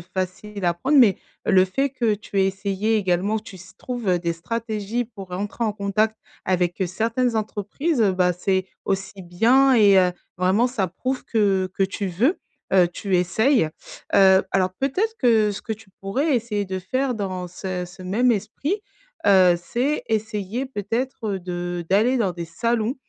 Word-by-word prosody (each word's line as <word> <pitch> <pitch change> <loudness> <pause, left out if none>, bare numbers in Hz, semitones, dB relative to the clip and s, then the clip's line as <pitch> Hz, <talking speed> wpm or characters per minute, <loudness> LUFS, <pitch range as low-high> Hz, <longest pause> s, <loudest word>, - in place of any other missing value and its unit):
facile 185 +3 -5
à 175 - +3
prendre, 265 - +1
mais 230 -8 +6 0.3
le 190 -2 +4
fait 270 +9 0
que 235 -5 +1
tu 200 -1 -3
aies 190 - +4
essayé 195 +3 -1
également, 195 +2 +1
tu 210 -3 -11
s 185 +1 -14
trouves 225 -8 -1
des 170 -1 -1
stratégies 220 +5 -3
pour 205 -5 -11
rentrer 200 +6 -3
en 215 - 0
contact 215 +2 0 0.3
avec, 180 0 0
heu, 190 - +2
certaines 230 +6 0
entreprises, 220 - -2
heu, 200 -4 +4
bah 180 -1 +2
c'est 190 +1 -1 0.2
aussi 195 0 -2
bien 245 +10 +4
et 205 -4 +6
heu, 180 -1 +3 0.3
vraiment 190 +6 +3
ça 225 -7 -1
prouve 255 +10 -4
que 195 -4 +1
que - - 0
tu 195 +1 -1
veux, 230 - +1 0.3
heu 185 -2 +5
tu 185 +1 -1
essayes, 220 - +2 0.5
heu, 190 -1 +6
alors 185 -1 +1
peut-être 375 +12 0
que, 225 -4 +3
ce 200 - -6
que 220 - -4
tu 215 -2 -19
pourrais 265 +10 0
essayer 215 -3 -2
de 190 -1 -4
faire, 255 +7 -1
dans 185 -4 -4
ce 180 0 -4
ce 180 +2 -14
même 225 +7 +2
esprit, 275 - -2 0.5
heu, 185 -3 +6
c'est 250 +11 -1
essayer 220 +2 -2
peut-être, 245 +1 -3
heu, - - -3
de 175 -1 -4
d'aller 220 +7 +3
dans 200 -5 +1
des 175 -1 -5
salons, 225 +7 -1
200 Hz, 175 wpm, -23 LUFS, 185-230 Hz, 0.5 s, mais